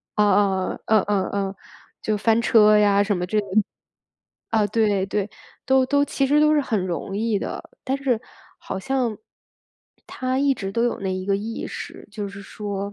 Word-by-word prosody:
嗯 210 -1 +4
嗯 190 -2 +1
嗯 215 -2 +4
嗯 200 -2 +1
嗯， 195 -1 -2 0.5
就 215 -1 0
翻 225 +2 +2
车 215 -2 +6
呀 200 -1 +4
什 205 -1 0
么 180 - -2
之 215 - -1
类。 205 - -3 1.1
啊， 220 -2 +3
对 205 -2 +1
对， 200 +1 -2 0.4
都 265 0 +4
都 285 +1 +3
其 275 -1 0
实 295 +2 +4
都 305 0 +5
是 295 - +4
很 215 -8 -1
容 190 +3 -4
易 220 -1 0
的， - - -6
但 265 +1 0
是 255 -5 0 0.4
好 - - -5
像， 245 -1 -1 0.9
她 255 0 -2
一 280 0 +3
直 195 -4 -5
都 230 +2 +1
有 240 - 0
那 190 -1 -2
一 185 0 -4
个 200 -1 +2
意 225 +3 -5
识， - - -8
就 205 -1 -5
是 200 0 -10
说 200 -1 -5
210 Hz, 200 characters per minute, -23 LUFS, 200-240 Hz, 1.1 s, 车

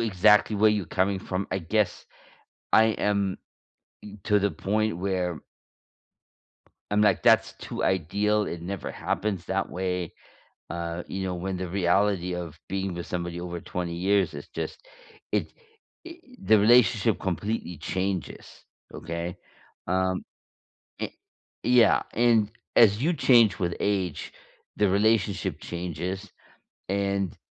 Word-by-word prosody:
exactly 105 0 +4
where 110 +1 +5
you 105 -4 -1
coming 95 +3 0
from, 95 0 -3
I 95 - 0
guess 100 +4 -1 0.7
I 110 - +7
am 100 -3 0 0.9
to 105 -2 +3
the 100 0 +1
point 110 0 -1
where 90 -3 -2 1.5
I'm 105 0 +2
like, 105 - +3
that's - - +4
too - - -5
ideal, 100 +4 +1
it 85 -3 -5
never 95 +1 -4
happens 95 -2 -2
that 95 0 -1
way, 90 -1 -3 0.6
uh, 85 0 -4
you 95 - -4
know, 90 - -2
when 95 +1 -3
the 90 -1 -4
reality 95 0 +1
of 85 -3 -6
being 95 -1 -2
with 85 0 -6
somebody 85 -1 -4
over 85 -1 -5
20 85 -1 -4
years 95 -1 +1
is 70 - -8
just - - -6 0.5
it - - 0 0.5
i 335 - -9 0.2
the 110 - +5
relationship 110 -1 +4
completely 95 0 -3
changes. 95 +2 -4 0.3
Okay? 85 +1 -5 0.5
Um, 95 0 0 0.8
an - - -2 0.5
Yeah, 120 -2 +5
and 115 -3 +3 0.2
as 105 -1 +6
you 170 +4 +2
change 120 -8 +5
with 85 -3 -1
age, 95 -6 -1 0.4
the 105 -1 +3
relationship 100 -4 +1
changes 90 +3 -5 0.6
and 100 -1 -1
95 Hz, 125 wpm, -26 LUFS, 90-105 Hz, 1.5 s, I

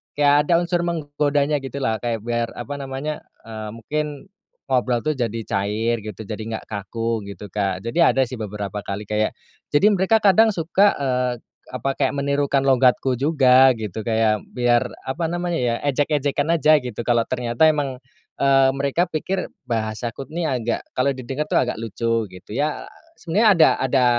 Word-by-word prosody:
kayak 145 0 +4
ada 170 0 +3
unsur 175 0 0
menggodanya 145 -3 0
gitu 135 -1 -8
lah 110 -2 0
kayak 115 -3 -3
biar 120 0 -1
apa 145 - -6
namanya, 140 +3 -5 0.2
eee, 110 -1 -6
mungkin 145 +8 -3 0.6
ngobrol 125 -2 +1
tuh 155 +1 -1
jadi 115 -2 -2
cair 105 +3 0
gitu 110 -1 -7
jadi 110 0 -4
nggak 110 0 -5
kaku 110 +2 -3
gitu 100 +1 -9
Kak 95 -2 -2
jadi 165 +9 +3
ada 135 - +2
sih 125 - -6
beberapa 105 -1 -5
kali 100 +1 -4
kayak, 105 0 0 0.4
jadi 145 +8 +5
mereka 200 +3 +3
kadang 215 +2 +5
suka, 185 +5 +3
eee, 125 -2 0 0.4
apa 130 +2 -2
kayak 135 -1 +1
menirukan 140 0 +1
logatku 130 -1 +3
juga 135 -3 +5
gitu 110 -1 -5
kayak 110 -2 +2
biar 120 0 +2 0.2
apa 155 +6 -2
namanya 175 0 -2
ya 120 -1 +1
ejek-ejekan 145 +1 0
aja 155 -1 +5
gitu 120 -3 -5
kalau 120 -1 +1
ternyata 125 +3 +1
emang, 145 -4 +1 0.4
eee, 135 -1 +4
mereka 140 +6 0
pikir 185 +4 -3 0.2
bahasaku 115 +2 -3
ini 170 +1 -3
agak 125 -6 -2
kalau 130 +2 +1
di 130 - -8
dekat 150 +5 -3
tuh - - +2
agak 125 -1 0
lucu 115 0 -1
gitu 90 +3 -12
ya. 150 +5 -1 0.3
Sebenarnya 205 +7 +3
ada 165 -5 +6
ada 130 -1 +2
130 Hz, 165 wpm, -22 LUFS, 115-150 Hz, 0.6 s, ada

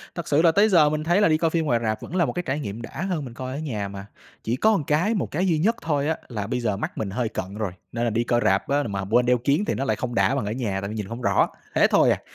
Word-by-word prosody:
Thật 170 - -5
sự 145 +2 +3
là 165 -1 +5
tới 205 +5 +4
giờ 160 -6 +5
mình 155 0 -2
thấy 175 +5 +2
là - - +5
đi 155 -1 +3
coi 165 0 +1
phim 160 -1 0
ngoài 120 -5 +2
rạp 110 -1 -1
vẫn 180 - -7
là 175 - +3
một - - -3
cái 180 - -3
trải 140 +3 -1
nghiệm 110 -3 -5
đã 140 +7 -7
hơn 155 -6 -2
mình 120 - -9
coi 130 +1 -6
ở 145 - -4
nhà 110 -10 -3
mà, 100 0 -8 0.4
chỉ 115 - -1
có 215 +9 +3
một 155 - -3
cái 170 +9 +2
một 205 - -2
cái 180 +5 0
duy 165 -4 +2
nhất 225 +8 +2
thôi 145 -2 0
á, 160 - 0
là 105 -5 -4
bây 125 - -1
giờ 105 -4 -1
mắt - - -5
mình 105 -3 -2
hơi 115 +2 -2
cận 95 -3 -5
rồi, 105 -4 -2 0.2
nên 120 0 -2
là 120 - +2
đi 115 +2 0
coi 120 0 +1
rạp 95 0 +2
á 145 +1 +1
mà 100 -5 -3
quên 120 +2 +4
đeo 125 0 +3
kiếng 140 - +1
thì - - 0
nó 135 - -2
lại 110 -4 +1
không 120 0 -4
đã 135 - +3
bằng 135 -7 -1
ở 105 - -2
nhà 105 -6 -2
tại 100 - -4
vì 110 - -5
nhìn 105 - -3
hông 115 +5 -7
rõ, - - +2 0.3
thế - - +5
thôi - - +4
à. - - -1
130 Hz, 340 wpm, -24 LUFS, 110-160 Hz, 0.4 s, là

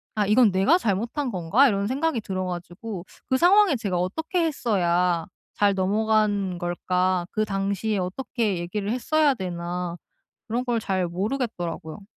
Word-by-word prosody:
'아 210 -1 +1
이건 215 +1 +5
내가 195 - +4
잘못한 235 - -1
건가?' 190 +10 +3
이런 200 -4 0
생각이 275 0 0
들어 185 -2 -3
가지고 180 +2 -6 0.2
그 260 - +3
상황에 370 +1 +5
제가 200 -6 -2
어떻게 320 - -1
했어야 180 - +1 0.3
잘 205 -1 +3
넘어간 205 -1 +1
걸까? 180 +1 0
그 215 - 0
당시에 200 +1 -1
어떻게 215 +2 -2
얘기를 195 +4 -3
했어야 290 +4 +2
되나 175 -3 -4 0.5
그런 235 +2 -1
걸 240 -2 0
잘 190 -4 -1
모르겠더라고요. 185 - -4
200 Hz, 315 characters per minute, -25 LUFS, 180-240 Hz, 0.5 s, 이건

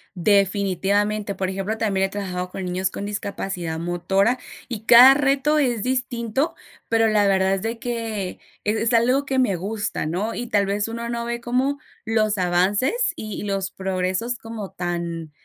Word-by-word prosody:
Definitivamente, 200 +2 +1
por 190 0 -2
ejemplo, 195 +3 -3
también 195 -4 +1
he - - -13
trabajado 180 -2 -4
con 185 +1 -6
niños 185 +1 -1
con 200 - -6
discapacidad 195 -5 -4
motora, 185 +7 +1 0.3
y 230 -4 -5
cada 245 +4 +10
reto 285 +2 +2
es 245 -7 +1
distinto, 250 +1 -1 0.4
pero 225 0 +3
la 210 -2 +3
verdad 190 -1 +3
es 195 - -1
de 230 +2 -3
que, 225 -6 -4 0.3
es 210 +1 +1
es 225 +2 +1
algo 250 +5 +3
que 270 -1 0
me 230 -7 +2
gusta, 205 +3 -3
¿no?, 190 +8 -2
y 240 - -4
tal 205 -4 +2
vez 205 +2 -1
uno 235 +1 -4
no 235 0 -3
ve 235 0 -3
como 255 +4 0 0.3
los 215 -1 +1
avances 185 - +2 0.2
y 215 - -7
y - - -5
los 195 -1 -2
progresos 190 +5 -2
como 225 -4 -7
tan 170 -2 -4
205 Hz, 170 wpm, -23 LUFS, 190-235 Hz, 0.4 s, cada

